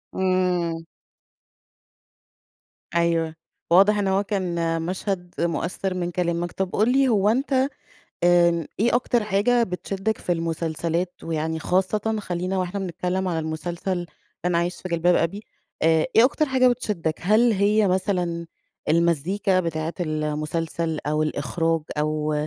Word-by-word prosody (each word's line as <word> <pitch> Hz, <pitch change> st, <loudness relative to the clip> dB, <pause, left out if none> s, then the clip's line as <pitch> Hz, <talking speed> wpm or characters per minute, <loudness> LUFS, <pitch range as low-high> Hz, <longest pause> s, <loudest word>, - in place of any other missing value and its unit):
إمم. 180 Hz, -3 st, 0 dB, 2.1 s
أيوه، 165 Hz, -1 st, +1 dB, 0.4 s
واضح 200 Hz, +4 st, +6 dB
إن 200 Hz, -1 st, 0 dB
هو 195 Hz, +1 st, +2 dB
كان 170 Hz, -5 st, -1 dB
مشهد 180 Hz, +1 st, -3 dB
مؤثر 175 Hz, +3 st, -1 dB
من 175 Hz, -1 st, -2 dB
كلامك. 175 Hz, 0 st, -1 dB
طب، 190 Hz, -1 st, -3 dB
قل 220 Hz, +4 st, +3 dB
لي 270 Hz, +1 st, +4 dB
هو 205 Hz, -3 st, +3 dB
أنتَ 265 Hz, +5 st, 0 dB, 0.7 s
آمم، 170 Hz, -2 st, +4 dB
إيه 235 Hz, +2 st, +3 dB
أكتر 240 Hz, -3 st, 0 dB
حاجة 215 Hz, +4 st, +2 dB
بتشدك 195 Hz, +2 st, -2 dB
في 175 Hz, -, -1 dB
المسلسلات؟ 165 Hz, +1 st, -2 dB
ويعني 160 Hz, 0 st, -2 dB
خاصةً 200 Hz, +6 st, 0 dB
خلينا 180 Hz, 0 st, -2 dB
وإحنا 185 Hz, +2 st, -2 dB
بنتكلم 185 Hz, +1 st, -2 dB
على 170 Hz, -2 st, -1 dB
المسلسل 170 Hz, +3 st, -3 dB, 0.4 s
لن 180 Hz, -, +1 dB
أعيش 170 Hz, +1 st, 0 dB
في 185 Hz, -, -5 dB
جلباب 170 Hz, +1 st, +2 dB
أبي، 185 Hz, +6 st, 0 dB, 0.4 s
آآ، 160 Hz, -1 st, +4 dB
إيه 225 Hz, -, +8 dB
أكتر 305 Hz, +3 st, +2 dB
حاجة 260 Hz, -1 st, +4 dB
بتشدك؟ 210 Hz, -10 st, -1 dB
هل 220 Hz, +6 st, +4 dB
هي 205 Hz, +1 st, +3 dB
مثلًا 180 Hz, -3 st, -1 dB, 0.4 s
المزيكا 170 Hz, +4 st, +2 dB
بتاعة 165 Hz, -1 st, -3 dB
المسلسل 155 Hz, +1 st, -2 dB
أو 150 Hz, +1 st, +1 dB
الإخراج 165 Hz, +1 st, 0 dB, 0.2 s
أو 155 Hz, 0 st, 0 dB
175 Hz, 130 wpm, -24 LUFS, 165-195 Hz, 2.1 s, إيه